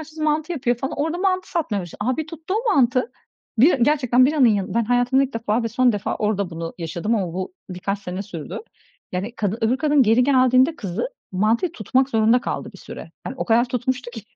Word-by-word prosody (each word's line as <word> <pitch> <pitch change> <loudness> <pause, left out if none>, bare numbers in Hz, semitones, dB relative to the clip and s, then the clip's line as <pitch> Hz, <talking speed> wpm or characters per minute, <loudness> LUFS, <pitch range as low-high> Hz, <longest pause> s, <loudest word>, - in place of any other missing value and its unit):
açması 315 0 -8
mantı 310 +2 0
yapıyor 250 -6 0
falan, 265 +3 -4
orada 320 +4 -1
mantı 370 -1 0
satmaya 295 - -1
başladı. 175 - -11
A! 255 +2 0
Bir 315 -1 -3
tuttu 330 +3 -5
o 440 -1 +1
mantı. 255 -1 +2 0.5
Bira 280 +9 +6
gerçekten 255 -1 +3
biranın 285 -3 +4
yanın 205 -3 0
Ben 235 0 +2
hayatımda 245 +3 +2
ilk 270 - -8
defa 230 0 0
ve 230 - -1
son 245 +1 +3
defa 205 -1 -2
orada 205 -3 -1
bunu 165 0 -6
yaşadım 170 +7 -2
ama 190 -6 -1
bu 190 - -4 0.2
birkaç 190 +3 -3
sene 185 -1 -5
sürdü. 170 -8 -7 0.5
Yani 195 +6 -3
kadın 210 +1 -1
öbür 230 +3 +2
kadın 295 -1 +3
geri 230 +2 +4
geldiğinde 260 +2 +4
kızı, 200 - -4 0.2
mantıyı 220 - +1
tutmak 255 +5 +1
zorunda 225 +2 +3
kaldı - - -4
bir - - -13
süre. - - -10 0.2
Yani - - -5
o - - -1
kadar 235 +1 +3
tutmuştu 250 0 -2
ki. 225 -3 -9
245 Hz, 210 wpm, -22 LUFS, 210-285 Hz, 0.5 s, Bira